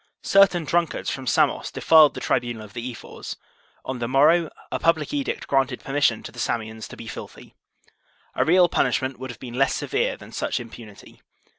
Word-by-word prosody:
Certain 195 -4 +4
drunkards 170 +1 0
from 135 -1 -6
Samos - - +2
defiled 155 -2 +5
the - - -4
tribunal 120 -3 -1
of 105 -2 -13
the 120 +1 -5
ephors; 115 - -9 0.5
on 130 -1 -4
the 120 - -2
morrow 155 +6 +4 0.2
a - - -2
public 165 - +1
edict 280 -2 -2
granted 135 -2 0
permission 135 -5 +1
to - - -8
the 120 - -12
Samians 110 -2 -3
to - - -11
be 115 - -9
filthy. 110 - -10 0.8
A - - +1
real 175 +2 +5
punishment 130 -5 0
would 130 0 -6
have 120 - -9
been 125 -3 -8
less 135 - +3
severe - - -1
than - - -13
such - - -2
im 115 -2 -9
punity. 105 -4 -13
130 Hz, 185 wpm, -24 LUFS, 120-160 Hz, 0.8 s, defiled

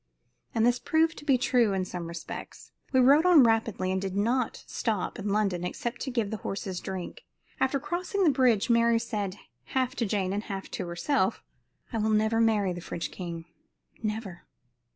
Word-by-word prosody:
And 225 0 +3
this 245 +1 +3
proved 320 0 +2
to 295 - -13
be 275 -3 +4
true 240 -4 +2
in 190 -1 0
some 175 -2 -5
respects. 170 0 -8 0.2
We 260 - +4
rode 280 +5 +6
on 355 -6 +7
rapidly 225 -5 +1
and 190 0 0
did 195 -1 -3
not 235 +4 0
stop 220 0 -2
in 205 0 -3
London 200 -4 +1
except 235 +6 -4
to 275 - -2
give 230 -5 -1
the 220 - -2
horses 190 -2 -4
drink. 190 -2 -6 0.4
After 265 +1 +1
crossing 360 - -2
the 320 - +5
bridge, 240 -5 +3
Mary 235 0 +4
said, 210 -5 -3 0.4
half 255 -1 +1
to 230 - 0
Jane 195 -2 0
and 205 +2 -3
half 195 -2 -6
to 180 - -4
herself: 190 - 0 0.5
"I 225 - 0
will 220 +1 +1
never 220 +1 +2
marry 210 -5 +2
the 175 - -7
French 170 - -5
king 170 -3 -6 0.6
never." 210 -5 -4
220 Hz, 185 wpm, -28 LUFS, 190-250 Hz, 0.6 s, on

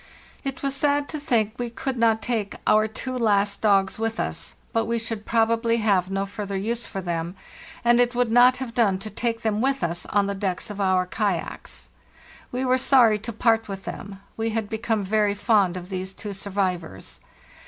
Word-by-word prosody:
"It 270 -1 -5
was 275 -1 0
sad 285 +1 +1
to 305 - -4
think 225 -7 +1
we 240 -1 -2
could 260 +3 -3
not 225 -2 +2
take 220 -5 -2
our 215 0 +4
two 255 +4 -5
last 205 -4 +1
dogs 195 -2 +3
with 225 0 -2
us, - - -3 0.2
but 225 -1 +1
we 235 +1 0
should 225 -2 -5
probably 230 0 +2
have 200 -5 +2
no 195 0 -1
further 200 -1 -5
use 230 +4 -2
for 195 - -5
them, 170 0 -3 0.5
and 240 0 +5
it 245 0 +2
would 245 -2 +1
not 250 +2 +6
have 250 -3 -5
done 210 -6 +3
to 210 +3 -8
take 230 +1 -2
them 215 -1 0
with 270 -4 +1
us 170 +1 -2
on 205 -1 +2
the 200 - -1
decks 195 0 -2
of 205 0 -5
our 185 -1 +2
kayaks. 195 -2 -3 0.6
We 255 +1 -1
were 255 0 +3
sorry 240 -5 +5
to 225 +3 -5
part 225 0 +2
with 195 -1 -7
them; 195 -1 -7 0.2
we 225 0 -1
had 220 -2 -2
become 220 -1 -1
very 205 +1 +1
fond 205 -3 +2
of 180 0 -8
these 190 0 -5
two 210 -2 -6
survivors. 185 - -3
215 Hz, 195 wpm, -24 LUFS, 195-235 Hz, 0.6 s, not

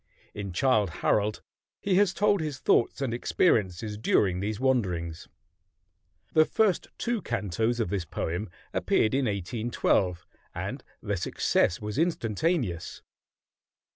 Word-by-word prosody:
In 100 -2 -5
"Childe 105 0 +2 0.2
Harold" 105 0 +1 0.4
he 200 - -1
has 200 -2 +4
told 205 -1 +2
his 150 -4 -3
thoughts 125 +1 +2
and 130 -4 -1
experiences 105 - +1
during 95 -4 +2
these 105 +2 -2
wanderings. 90 -11 0 1.1
The 155 - +7
first 200 +2 +1
two 235 -2 -1
cantos 115 - -1
of 115 - 0
this 100 -4 -2
poem 85 +5 -3 0.2
appeared 110 - +2
in 135 0 +2
1812, 105 -3 0 0.3
and - - -4 0.2
their - - -1
success 90 - +1
was 105 +5 -3
instantaneous. 125 - -1
110 Hz, 120 wpm, -28 LUFS, 95-135 Hz, 1.1 s, The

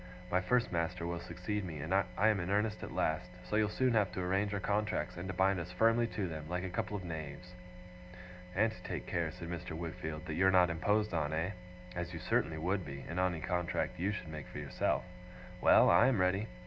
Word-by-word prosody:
'My 90 - +3
first 125 +6 +2
master 85 0 -1
will 85 0 -2
succeed 90 +5 -3
me 80 -5 -5 0.4
I 105 - +4
am 105 -2 +2
in 85 +1 -3
earnest 105 +2 +1
at - - -6
last 80 +2 0 0.2
so - - -1
you'll 105 -1 +3
soon 130 +3 +2
have 105 -4 +3
to - - -3
arrange 95 +3 +1
our 100 - -1
contracts, 105 +2 -1
and 90 +2 -5
to 95 - -3
bind 95 0 +3
us 85 +1 -5
firmly 115 +5 +3
to 100 -4 -2
them, 80 -2 -6
like 90 +1 -1
a 95 - -4
couple 105 +3 -2
of 95 - -7
knaves.' 80 +1 -6 1.0
'And 110 +3 +3
to 110 - -12
take - - -4
care,' 85 -2 -1
said 85 -1 -7
Mr. 85 -2 -5
Wickfield, 80 -2 -5
'that 80 - -4
you're 95 +4 +4
not 90 -2 +5
imposed 105 +5 +1
on, 80 -2 0
eh? 85 +4 0 0.4
As 85 0 -4
you - - -5
certainly 80 0 0
would 90 +4 0
be, 70 -3 -7
in 85 - -3
any 90 -3 +1
contract 90 0 -1
you 95 +4 +1
should 105 -5 -5
make 75 -2 -7
for - - -9
yourself. 70 -3 0 0.6
Well! - - +7
I 120 - +7
am 130 -6 +3
ready. 95 +3 +2
90 Hz, 225 wpm, -34 LUFS, 85-100 Hz, 1.0 s, Well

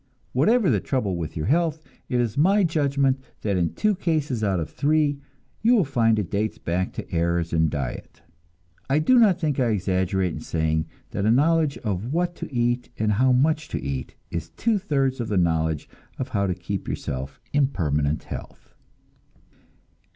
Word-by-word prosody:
Whatever 200 - +3
the - - +2
trouble 110 -9 -1
with 80 -3 -5
your 75 - -2
health, 160 - +1 0.3
it 125 - +1
is 115 -3 0
my 195 +8 +4
judgment 140 -5 +1 0.2
that 100 -2 0
in 85 -3 0
two 215 -1 +2
cases 155 - -1
out 95 -3 +1
of 80 - -4
three 145 -1 +1 0.4
you 235 +3 +5
will 200 -7 +3
find 115 -5 +2
it 105 -5 -2
dates 105 +2 -1
back 90 +2 -2
to - - -7
errors 85 0 0
in 80 -1 +3
diet. 70 -5 -5 0.7
I 135 - +3
do 240 +12 +5
not 200 -6 +5
think 150 -5 0
I 125 - +3
exaggerate 95 -3 0
in - - -5
saying 80 -1 -1 0.2
that 100 - -1
a - - +4
knowledge 150 +4 +3
of 105 +2 -2
what 175 +2 0
to - - -7
eat 120 0 0
and 110 -1 +1
how 130 +5 +3
much 150 +4 +2
to - - -3
eat 70 -2 -4 0.2
is 85 -1 -4
two 215 - 0
thirds 135 -8 0
of 120 - -2
the 105 - 0
knowledge 80 -3 +1 0.3
of 130 0 -4
how 100 -4 0
to 90 - -1
keep 95 +1 -5
yourself 65 0 -4
in 145 -2 +4
permanent 75 - -1
health. - - -9
120 Hz, 180 wpm, -24 LUFS, -, 0.7 s, you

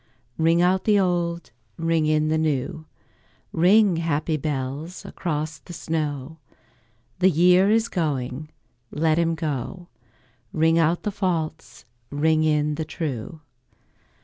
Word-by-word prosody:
Ring 165 +2 +3
out 185 +1 +2
the 210 -2 +4
old, 175 -2 -1 0.3
ring 165 -2 +1
in 155 0 +2
the 160 - +2
new, 155 +1 -2 0.7
Ring, 190 +2 +4
happy 160 -1 0
bells, 145 +3 -4
across 155 -2 -4
the 175 - -12
snow: 155 -2 -3 0.8
The 190 +1 +5
year 180 +3 +5
is 225 +1 +3
going, 150 - -3 0.4
let 155 +1 +1
him 165 -1 +1
go; 160 +3 -4 0.6
Ring 165 +1 +3
out 165 +2 +2
the 210 - -1
false, 175 - -3 0.2
ring 155 +2 +2
in 150 -1 +1
the 160 +2 -3
true. 155 -1 -5
160 Hz, 120 wpm, -24 LUFS, 150-175 Hz, 0.8 s, The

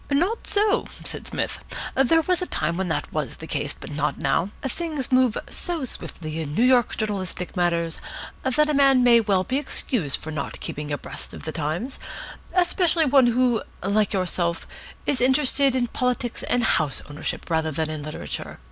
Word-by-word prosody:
"Not 350 +11 0
so," 415 0 +3 0.2
said - - -4
Psmith. - - -2 0.3
"There 320 +5 +4
was 360 +2 +1
a 360 - -2
time 160 +2 -1
when 190 +1 -1
that 160 - -2
was - - -2
the - - -8
case, - - -2
but - - -9
not - - -1
now. 185 - +1
Things 295 0 -3
move 255 -3 +4
so 340 -6 -1
swiftly 160 -9 -4
in 150 -1 -5
New 230 - +3
York 250 -2 +4
journalistic 190 -4 -3
matters 170 -2 0 0.4
that 270 +4 +3
a 300 - +1
man 275 -2 +5
may 235 -1 +7
well 195 -4 +2
be 260 +7 0
excused 225 - 0
for 160 - -7
not 150 -3 -4
keeping 150 0 -5
abreast 145 - -5
of - - -10
the 155 - -4
times, 165 - -3 0.6
especially 350 -2 +4
one 270 -3 +5
who, 240 -1 +2 0.2
like 205 +2 +2
yourself, 175 -3 -1 0.4
is 280 -4 +1
interested 265 0 +3
in 250 -2 +2
politics 245 0 -1
and 245 -1 +1
house 155 - +2
ownership 150 +1 -4
rather 160 -1 +1
than 155 +1 -1
in 155 -1 -4
literature. 155 +1 -5
240 Hz, 175 wpm, -24 LUFS, 170-275 Hz, 0.6 s, may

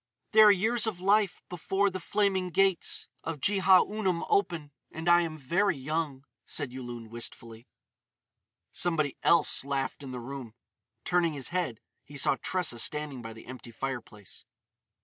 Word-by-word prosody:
"There 220 -1 +8
are - - +9
years 220 +4 +2
of 200 -5 -3
life 200 +1 +2
before 195 +3 0
the 185 - -4
flaming 190 -1 0
gates 195 +1 +2 0.2
of 165 -2 -4
Jehaunum 190 +1 +3
open. 170 - 0 0.2
And 160 +2 -6
I 175 0 +6
am 160 -2 -4
very 170 +6 +1
young," 145 -1 -3 0.2
said 145 -5 -4
Yulun 120 -3 -7
wistfully. 115 0 -7 1.0
Somebody 155 -5 0
else 170 -5 +3
laughed 140 0 -2
in 135 - -8
the 125 -1 -5
room. 120 -2 -8 0.5
Turning 175 -3 +2
his 140 -3 -2
head, 175 -11 -2 0.2
he 145 - -11
saw 135 - +2
Tressa 180 -10 0
standing 150 -1 -1
by 115 -1 -8
the 110 - -13
empty 130 -1 -9
fireplace. 115 -5 -7
160 Hz, 150 wpm, -29 LUFS, 130-185 Hz, 1.0 s, are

